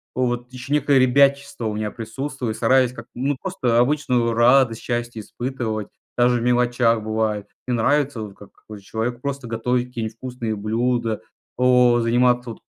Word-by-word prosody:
вот 120 -1 -1
ещё 130 +2 -5
некое 145 -1 +3
ребячество 140 0 +3
у 105 - -2
меня 105 0 -3
присутствует, 120 +1 -5
стараюсь 125 +1 +3
как, - - -9
ну, 135 +2 -1
просто 130 -11 -1
обычную 125 -3 +1
радость, 120 0 +4
счастье 120 -2 -3
испытывать 115 -3 -4 0.3
даже 120 0 +3
в - - -3
мелочах 120 -2 +2
бывает. 110 -1 -1 0.2
Мне 125 - 0
нравится 140 0 +1
вот, 100 -2 -9
как 105 - -15
какой-то 105 -2 -13
человек, 120 +4 -3
просто 140 -2 -4
готовить 125 +2 -1
какие-нибудь 115 -3 -5
вкусные 120 -4 -4
блюда, 115 +2 -1 0.4
о 125 -1 +4
заниматься 120 +1 +2
от - - -11
120 Hz, 155 wpm, -22 LUFS, 115-130 Hz, 0.4 s, радость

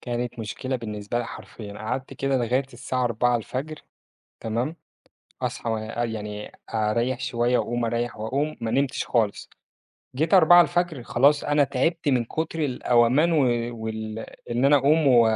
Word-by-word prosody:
كانت 120 0 -4
مشكلة 130 +4 -3
بالنسبة 105 -1 -4
لي 120 - -2
حرفيًا 105 -3 -9
قعدت 125 +5 -4
كده 135 0 0
لغاية 125 +2 +1
الساعة 125 +1 -2
04:00 125 +5 -1 0.6
تمام؟ 120 +8 -2 0.7
أصحى 115 - -2
وأ 110 +2 -2
يعني 105 -2 -5 0.2
أريّح 115 +3 0
شوية 120 0 +1
وأقوم، 120 0 -1
أريّح 120 +1 -2
وأقوم، 140 +8 -2
ما 115 -1 -2
نمتش 135 +2 0
خالص 110 -4 0 0.7
جيت 160 +8 0
04:00 175 -4 +5
خلاص 140 +5 +3
أنا 145 0 +3
تعبت 155 +5 -1
من 125 -4 +2
كتر 160 +5 -3
القومان 125 +4 +3
و 165 - +2 0.5
وال 110 0 -4 0.3
إن 120 +3 +1
أنا 145 - +6
أقوم 150 +3 +3
و 125 -3 +7
125 Hz, 140 wpm, -25 LUFS, 115-140 Hz, 0.7 s, و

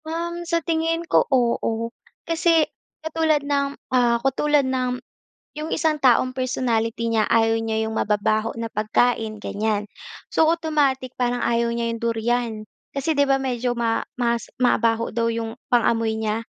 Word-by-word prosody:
Um, 340 +2 -3
sa 335 -2 0
tingin 330 +1 0
ko, - - +2
oo. 235 -3 0 0.3
Kasi 330 -1 +3 0.4
katulad 315 -2 +1
ng, 280 -1 0 0.2
ah, 240 -2 +4
katulad 285 +1 +2
ng 255 -1 -1 0.6
yung 305 +1 -4
isang 315 -2 +1
taong 255 0 +4
personality 230 -3 -1
niya 220 -1 +3
ayaw 225 0 +3
niya 220 0 -1
yung 220 0 -3
mababaho 215 +2 +1
na 230 0 -3
pagkain, 220 +1 +1
ganiyan. 210 0 -1 0.5
So, 320 - +4
automatic 290 -6 0
parang 245 -1 0
ayaw 235 0 +1
niya 235 0 -1
yung 230 - -7
durian, 235 +1 0 0.4
kasi 285 +3 0
di 285 - +2
ba 270 -1 +3
medyo 250 -2 -1
ma 230 -1 +1 0.2
mas 235 -1 -1
mabaho 230 -2 +2
daw 230 -1 +1
yung 225 -1 -3 0.2
pang-amoy 230 -2 +2
niya, 220 0 -1
245 Hz, 150 wpm, -23 LUFS, 225-285 Hz, 0.6 s, ah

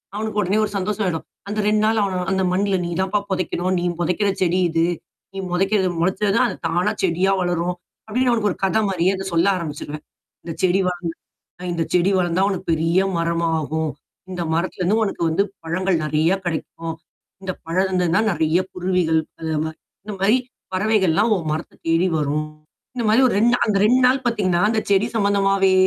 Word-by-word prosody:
அவனுக்கு 215 0 -2
உடனே 200 +2 +1
ஒரு 205 - -7
சந்தோஷம் 205 +2 -1
ஆயிடும். 165 -3 -2 0.2
அந்த 210 +1 -3
2 210 0 +3
நாள்ல 220 0 +2
அவன 185 -2 -2
"அந்த 190 0 +1
மண்ல 200 +1 +1
நீ 170 - -3
தான்ப்பா 190 +2 +1
பொதைக்கணும், 185 -1 -1
நீ - - -3 0.2
பொதைக்கிற 180 +4 +1
செடி 180 0 +2
இது, 165 0 +1 0.5
நீ - - -9
புதைக்கிறது 195 +2 +2
மொளச்சா 190 +4 +1
தான் 255 - +4
அது - - -5
தானா 175 +2 +1
செடியா 185 +2 +2
வளரும்" 175 0 0 0.3
அப்டீன்னு 250 +3 +1
அவனுக்கு 225 -3 +1
ஒரு - - -6
கதை 220 +3 +2
மாரியே 185 0 +1
அதைச 190 0 -5
சொல்ல 170 +3 +3
ஆரம்பிச்சுருவேன். 150 -2 -6 0.4
இந்தச் 165 -2 -6
செடி 185 +1 +3
வளந்து 175 -2 -3 0.5
அ - - -9
இந்தச் 165 -2 -3
செடி 180 +2 +3
வளந்தா 175 0 +1
உனக்கு 195 -3 -4
பெரிய 165 +3 +2 0.2
மரமாகும், 160 -2 -1 0.4
இந்த 180 -2 -3
மரத்திலிருந்து 185 +4 0
உனக்கு 195 - -4
வந்து 175 +5 +2 0.2
பழங்கள் 175 +1 0
நெறையா 155 +5 +2
கிடைக்கும் 165 0 -4 0.5
இந்தப் 185 -2 -5
பழம் 180 +4 +1
இருந்ததுன்னா 180 0 +1
நெறையா 165 +1 +1
குருவிகள் 180 -3 +1 0.2
அது 160 -1 -2
மாரி 160 0 -5 0.3
இந்த 210 0 -6
மாரி 215 +6 +4 0.4
பறவைகள் 190 -3 +2
எல்லாம் 215 +6 +3
உன் 165 -4 -4
மரத்தைத் 160 +2 -6
தேடி 165 +3 +3
வரும். 150 +1 -1 0.5
இந்த 240 -2 -2
மாரி 225 +4 +5
ஒரு - - -1
2 235 +3 +4
நா - - +1
அந்த 210 -3 +2
2 250 +4 +4
நாள் 260 +1 +2
பாத்தீங்கன்னா, 195 -7 +1
அந்தச் 220 -1 -1
செடி 200 +2 +4
சம்மந்தமாவே 195 -2 +3
185 Hz, 180 wpm, -21 LUFS, 165-200 Hz, 0.5 s, மாரி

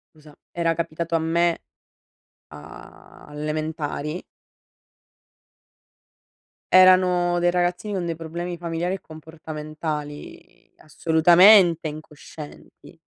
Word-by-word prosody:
Scusa, 150 -1 -18
era 170 -1 -1
capitato 165 0 -4
a 165 - +3
me 170 +1 0 0.9
a 75 +2 -14
all'elementari 150 +1 -4 2.5
erano 180 -1 +5
dei 175 0 +2
ragazzini 180 +3 -1
con 180 -2 -3
dei 165 -1 -3
problemi 170 +2 -6
familiari 170 +1 -3
e 195 - -11
comportamentali 155 -1 -8
assolutamente 170 +3 +4
incoscienti. 150 0 -12
165 Hz, 80 wpm, -23 LUFS, 155-175 Hz, 2.5 s, erano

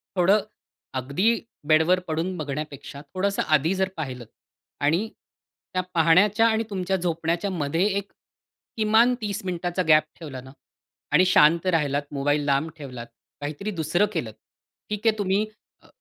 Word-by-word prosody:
थोडं 195 +3 +4 0.5
अगदी 135 - -2 0.5
बेडवर 160 +4 +4
पडून 165 +4 -2
बघण्यापेक्षा, 145 -1 -6
थोडंसं 200 +2 0
आधी 155 +4 +3
जर 190 0 0
पाहिलं 130 -5 -5 0.6
आणि 170 +10 +1 0.6
त्या 185 - +1
पाहण्याच्या 190 +7 +4
आणि 220 0 +1
तुमच्या 190 -1 -1
झोपण्याच्यामध्ये 170 -1 -1
एक 200 - -5 0.7
किमान 220 +3 +4
30 205 0 -3
मिनिटाचा 180 0 -2
गॅप 155 -1 +6 0.2
ठेवला 140 -6 -7
ना 130 +1 -13 0.6
आणि 185 - +6
शांत 165 -1 +5
राहिलात, 145 -2 +1
मोबाईल 145 +1 0
लांब 140 +3 +1
ठेवलात, 125 -5 -8 0.3
काहीतरी 150 +9 -4
दुसरं 160 +6 +2
केलत. 120 - -3 0.6
ठीक 210 +2 -2
आहे 220 - +3
तुम्ही 200 +1 +1 0.4
अ, - - -22
170 Hz, 130 wpm, -25 LUFS, 145-195 Hz, 0.7 s, गॅप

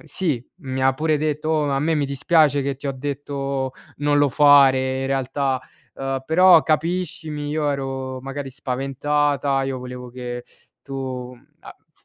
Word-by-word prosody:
sì, 145 -10 -1
mi 130 -6 -4
ha 135 0 +4
pure 155 +2 +1
detto: 150 +1 -2
"Oh, 150 -2 +1
a 135 0 0
me 160 +2 +1
mi 150 - +1
dispiace 145 +1 +3
che 140 0 -2
ti 140 - -7
ho 140 - -1
detto 135 -1 -3 0.3
non 145 0 +2
lo 145 -1 +4
fare, 135 -2 +5
in - - -2
realtà, 135 0 0 0.4
ehm, 135 0 -3
però 175 0 +6
capiscimi, 155 -2 -1
io 150 -1 0
ero 135 -1 -4
magari 135 +1 -6
spaventata, 140 +1 0
io 135 -1 -3
volevo 125 0 -8
che 120 -1 -6 0.4
tu 130 -2 -5 0.3
a" - - -12 0.2
f - - -20
140 Hz, 160 wpm, -22 LUFS, 130-150 Hz, 0.4 s, però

